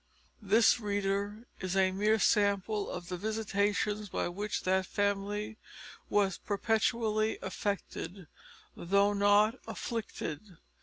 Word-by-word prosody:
This, 220 +4 +4
reader, 205 +1 -2
is 185 0 -3
a 190 -1 +4
mere 210 +3 +2
sample 205 0 +2
of 175 - -6
the 180 - -3
visitations 210 0 -1
by - - -1
which 205 +4 -3
that 185 0 +1
family 205 +2 -1 0.5
was 200 -2 +2
perpetually 220 +1 0
affected, 190 -1 -4 0.5
though 200 +3 +2
not 205 +4 +4
afflicted. 200 - -5
205 Hz, 105 wpm, -31 LUFS, 195-215 Hz, 0.5 s, This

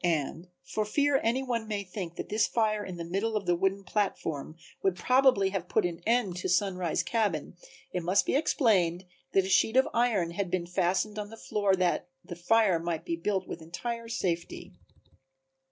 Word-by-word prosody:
(And 165 0 -1 0.2
for 215 +10 -2
fear 285 +6 +2
any 240 +4 +1
one 235 -4 -2
may 205 -2 -2
think 180 -3 -6
that - - -6
this 215 +1 +2
fire 215 -2 +1
in 185 -3 -7
the 170 - -4
middle 195 +6 -1
of 200 - -4
the 175 0 +3
wooden 195 +2 0
platform 165 -7 -2 0.3
would 190 -2 +1
probably 250 -3 +3
have 185 -3 -4
put - - +2
an 170 -1 -3
end 230 -6 +2
to 185 - -3
Sunrise 185 -5 +1
cabin 205 -10 -1 0.4
it 180 - -1
must 180 +4 +2
be - - 0
explained 190 - +2 0.3
that 195 -1 +4
a - - -4
sheet 220 +5 +3
of 265 - +5
iron 220 -8 +2
had 185 +1 -2
been 175 -1 -1
fastened 185 +4 0
on 205 0 -5
the 225 - -11
floor 205 -3 +1
that 180 -1 0 0.2
the 175 - -7
fire 190 0 +3
might 165 -1 -3
be 170 - -1
built 190 +2 -1
with 165 - -6
entire 230 +8 -5
safety.) 175 -6 -3
195 Hz, 190 wpm, -29 LUFS, 175-220 Hz, 0.4 s, of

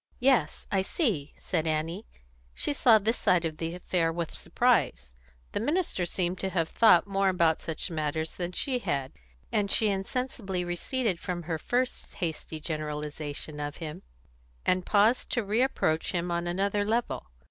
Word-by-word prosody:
"Yes, 250 - +2
I 195 - +3
see," 190 - -1
said 165 -3 -1
Annie. 160 +6 -2 0.5
She - - 0
saw 240 -5 +6
this 220 +3 0
side 175 -2 +3
of 155 -1 -3
the 165 +1 -3
affair 175 -2 0
with 170 -1 -3
surprise. 65 -1 +1 0.4
The - - -1
minister 290 - 0
seemed 180 +1 -1
to 190 - -1
have 170 -3 0
thought 200 -7 +6
more 195 -1 +2
about 170 -3 +2
such 160 +3 -3
matters 160 0 -2
than 175 -1 -3
she 255 +7 0
had, 140 - -2 0.4
and 205 -2 +1
she 215 +1 +4
insensibly 195 -2 -2
receded 185 +3 -1
from 175 -2 -4
her 165 -1 -2
first 250 +8 -1
hasty 160 -3 -4
generalisation 150 -1 -4
of 145 0 -3
him, 155 -3 -6 0.6
and 185 -1 +1
paused 215 +4 +3
to 240 - +1
reapproach 205 -7 +1
him 175 0 -1
on 170 0 -1
another 200 +3 +1
level. 225 - -1
180 Hz, 160 wpm, -29 LUFS, 160-210 Hz, 0.6 s, saw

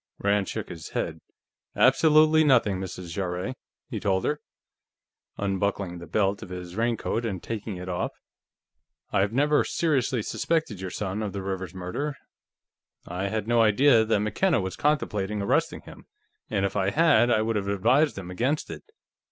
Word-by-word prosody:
Rand 100 0 +1
shook - - -5
his 80 -2 -8
head. - - -3 0.5
"Absolutely 155 +4 +5
nothing, 115 -10 +3
Mrs. 90 -2 -6
Jarrett," 90 +5 -3 0.3
he - - -4
told 95 -2 0
her, 150 0 -1 1.0
unbuckling 100 -2 -1
the 85 - -10
belt 100 +3 0
of - - -9
his 90 -1 -7
raincoat 115 +1 -1
and 95 -6 -4
taking 110 -3 -5
it 90 0 -7
off. 90 -1 -2 1.0
"I - - +2
have 100 +1 +2
never 145 +5 +3
seriously 130 -8 0
suspected 155 - -1
your 95 - -4
son 100 +2 -3
of 105 -3 -3
the 100 -1 -4
Rivers 95 -2 -4
murder, 95 +12 -3 0.9
I 90 +3 -3
had 110 0 -3
no 120 0 +4
idea 115 +2 +5
that 110 -1 +1
McKenna 135 - +1
was 95 -2 -3
contemplating 105 -9 0
arresting 100 - 0
him, - - -14 0.4
and 100 -2 0
if 95 - -3
I 95 -1 +1
had, 145 -4 +4
I 110 -2 +3
would 115 0 -1
have 100 -1 -1
advised 120 +10 +2
him 90 -2 -6
against 130 +11 -1
it. - - -7
105 Hz, 165 wpm, -26 LUFS, 95-125 Hz, 1.0 s, Absolutely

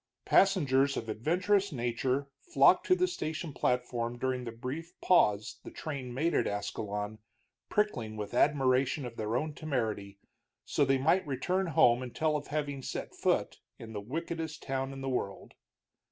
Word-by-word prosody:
Passengers 140 -8 +4
of 115 - -4
adventurous 185 - +1
nature 125 +2 -1
flocked 350 - +4
to 365 - +6
the 365 0 +2
station 160 - -4
platform 120 -2 -1
during 130 0 -1
the 115 - -4
brief 130 +9 -6
pause 105 - +3
the - - -8
train 140 -5 -5
made 155 +7 0
at - - +2
Ascalon, 105 +1 -3 0.5
prickling 120 - 0
with 105 +1 -5
admiration 135 +1 +2
of 120 -1 -7
their 110 +1 -2
own 150 +3 -2
temerity, 110 -10 -3 0.5
so - - +1
they 135 0 +3
might 160 +6 +2
return 180 +8 0
home 140 -7 +4
and 125 -2 -7
tell 155 -1 +1
of 145 -1 -3
having 145 -2 -2
set - - -5
foot - - 0 0.2
in 110 -1 -9
the 105 - -4
wickedest 160 +6 -4
town 135 0 -2
in 135 0 -7
the 135 - -4
world. 100 -6 -3
135 Hz, 160 wpm, -31 LUFS, 120-155 Hz, 0.5 s, to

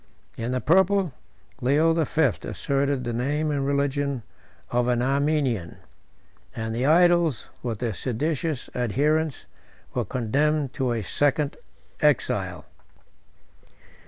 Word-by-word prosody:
In 115 +2 -3
the 130 0 -1
purple, 190 -1 +3 0.5
Leo 150 +6 +3
the 160 -3 +1
Fifth 150 -8 +1
asserted 140 -1 -1
the 120 -1 -3
name 145 +6 0
and 140 -1 -1
religion 140 -2 0 0.5
of 120 0 +1
an 120 -1 +2
Armenian; 135 - 0 0.8
and 110 0 -3
the 125 +4 0
idols, 170 -4 +3
with 115 -3 -3
their 115 0 -2
seditious 145 - -2
adherents, 145 +5 0 0.5
were - - 0
condemned 140 +4 0
to 130 -3 -1
a 115 -2 -1
second 145 - +1 0.4
exile. - - +1
140 Hz, 115 wpm, -25 LUFS, 125-155 Hz, 0.8 s, purple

